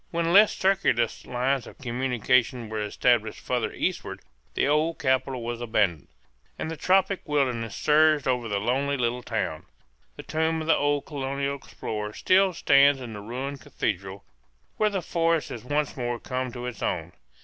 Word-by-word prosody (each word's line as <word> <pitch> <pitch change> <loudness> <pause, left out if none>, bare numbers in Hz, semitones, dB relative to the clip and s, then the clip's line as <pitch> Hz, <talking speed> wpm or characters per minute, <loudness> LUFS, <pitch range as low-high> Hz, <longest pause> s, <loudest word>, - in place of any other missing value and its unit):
When 170 0 0
less 205 +2 +6
circuitous 190 - +1
lines 125 +1 0
of - - -13
communication 125 -2 0
were 110 -1 -3
established 110 +1 +1
farther - - -2
eastward - - -3 0.3
the - - +2
old 155 +3 +1
capital 130 -4 0
was 120 0 -4
abandoned, 100 - 0 0.5
and 160 - -4
the - - -4
tropic 190 +3 +2
wilderness 125 -6 0
surged 155 -1 +3
over 125 -3 0
the 100 - 0
lonely 135 +6 0
little 120 0 -1
town. - - -3 0.5
The - - -9
tomb 160 +1 0
of - - -4
the 160 - +4
old 145 0 0
colonial 140 -1 -3
explorer 105 -5 -6
still 190 - +3
stands 140 -3 +5
in 120 -3 -7
the 105 - -7
ruined 130 +6 -5
cathedral, 95 +1 -4 0.5
where 215 - +3
the 195 -3 -3
forest 165 -3 +1
has 115 - -7
once 145 +3 -1
more 120 -2 -3
come 130 -1 -3
to 125 0 -6
its 125 -4 -6
own. - - -2
130 Hz, 165 wpm, -26 LUFS, 120-150 Hz, 0.5 s, less